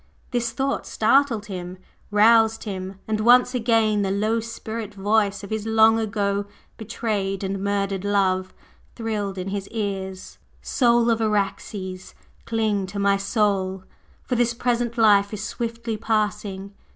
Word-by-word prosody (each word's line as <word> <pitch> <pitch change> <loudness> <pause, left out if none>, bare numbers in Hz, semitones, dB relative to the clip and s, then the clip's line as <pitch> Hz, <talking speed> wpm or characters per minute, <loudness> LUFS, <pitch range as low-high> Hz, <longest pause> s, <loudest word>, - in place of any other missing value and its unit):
This 240 -2 0
thought 270 +4 -2
startled 230 -1 +2
him 185 -2 -6 0.3
roused 225 +1 +4
him, 190 -2 -6
and 215 -1 -1
once 245 +3 +5
again 225 -3 +2
the 195 - 0
low 215 +4 +1
spirit 225 -2 -6
voice 205 0 +1
of 200 - -9
his 220 0 -3
long 225 0 +5
ago 200 -2 -1 0.3
betrayed 210 -3 -3
and 195 0 -3
murdered 200 -1 -1
love 190 -2 +1 0.4
thrilled 210 -4 -3
in 185 +1 -4
his 200 0 -4
ears: 195 -4 -5 0.2
"Soul 235 -2 +2
of 225 0 0
Araxes, 195 -3 -2 0.3
cling 215 -4 0
to 200 +2 -7
my 200 0 +3
soul! 195 -2 0 0.4
for - - -3
this 240 -1 +1
present 240 -1 -1
life 205 -3 +5
is 210 - -6
swiftly 230 0 -4
passing! 210 -3 -2
210 Hz, 140 wpm, -23 LUFS, 195-225 Hz, 0.4 s, once